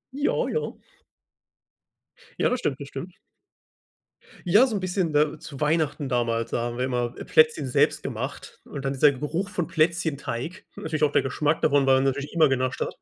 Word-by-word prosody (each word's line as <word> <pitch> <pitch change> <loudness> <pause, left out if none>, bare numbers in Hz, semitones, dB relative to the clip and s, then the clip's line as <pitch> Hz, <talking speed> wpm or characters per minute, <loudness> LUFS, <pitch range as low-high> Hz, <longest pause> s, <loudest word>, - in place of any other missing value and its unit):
Ja, 285 +1 0
ja. 465 - -2 1.7
Ja, - - +3
das 250 - 0
stimmt, 135 - -2
das 140 - -7
stimmt. 170 +7 -8 1.3
Ja, 210 +9 +6
so 225 - -3
'n 200 - -2
bisschen, 185 -2 -1
ne, 150 +1 +1
zu 140 -1 -10
Weihnachten 150 -2 0
damals, 115 -2 0
da - - 0
haben 120 0 -4
wir 125 - -1
immer, 125 -2 -1
äh, - - -6
Plätzchen 465 0 +3
selbst - - +2
gemacht - - -6
und 140 -2 -7
dann 135 - -1
dieser 140 +1 +4
Geruch 150 +8 -3
von 180 -6 -2
Plätzchenteig. 160 - -1
Natürlich 155 -1 -3
auch 145 - +3
der - - +4
Geschmack 150 +4 0
davon, 140 -1 +3
weil 135 0 +5
man 130 - +2
natürlich 140 +2 -1
immer 160 -4 +4
genascht 130 -1 -1
hat. - - -2
150 Hz, 185 wpm, -25 LUFS, 135-170 Hz, 1.7 s, Ja